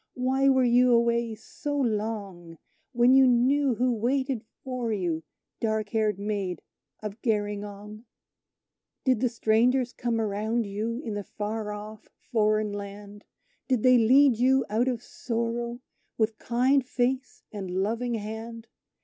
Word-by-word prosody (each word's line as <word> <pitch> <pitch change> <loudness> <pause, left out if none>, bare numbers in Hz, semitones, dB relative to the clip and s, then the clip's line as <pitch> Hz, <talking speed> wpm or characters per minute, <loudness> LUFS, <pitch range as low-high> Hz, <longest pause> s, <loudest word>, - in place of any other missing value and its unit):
Why 265 +2 +2
were 260 -1 +4
you 245 0 +4
away 235 -1 +2
so 290 +6 -5
long, 205 -8 -3 0.3
When 240 0 +4
you 265 0 +7
knew 255 +2 +3
who 250 +2 +1
waited 255 +1 -1 0.2
for 255 -3 -3
you, 175 -6 -1 0.4
dark 220 -2 -1
haired 215 -3 0
Maid 200 -4 -3 0.4
of 210 +1 -6
Gerringong? 210 0 -3 1.0
"Did 255 -4 +2
the 250 +1 +1
strangers 240 +3 +2
come 235 -1 -1
around 220 +2 -1
you, 215 +4 -3
in 225 -7 -5
the 205 0 -3
far 210 +1 -4
off 210 +1 -9
foreign 215 -2 0
land? 205 0 -8 0.4
Did 255 -5 +1
they 255 -1 +6
lead 255 +2 +5
you 260 +2 +3
out 230 +4 +1
of 245 -2 -2
sorrow, 235 +1 -3 0.4
with 220 -1 0
kind 255 +3 +2
face 255 +2 -2
and 195 -3 -6
loving 225 +6 -1
hand? 225 +2 -6
230 Hz, 135 wpm, -27 LUFS, 210-250 Hz, 1.0 s, you